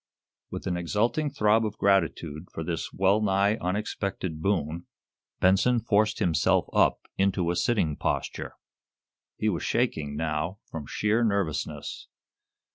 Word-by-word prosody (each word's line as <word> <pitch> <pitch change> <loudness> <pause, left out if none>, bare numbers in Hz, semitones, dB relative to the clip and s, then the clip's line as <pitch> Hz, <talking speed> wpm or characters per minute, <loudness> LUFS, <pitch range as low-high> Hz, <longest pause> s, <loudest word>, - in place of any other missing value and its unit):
With - - -6
an 90 -1 -1
exulting 110 - 0
throb 110 -4 +3
of 105 -1 -3
gratitude 85 -4 +1
for 80 - -5
this 80 0 -3
well 95 +3 +2
nigh 100 +1 +2
unexpected 95 -3 -3
boon, 85 -3 -1 0.5
Benson 100 +7 +4
forced 110 -1 +2
himself 85 -4 +2
up - - +3 0.2
into 95 -3 +2
a - - -1
sitting 85 -5 +1
posture. - - -3 0.8
He 110 - -1
was 90 -6 0
shaking, 75 - -1
now, 80 +4 -2
from 75 -4 -6
sheer 110 +3 +1
nervousness. 85 -8 -2
95 Hz, 125 wpm, -27 LUFS, 80-105 Hz, 0.8 s, Benson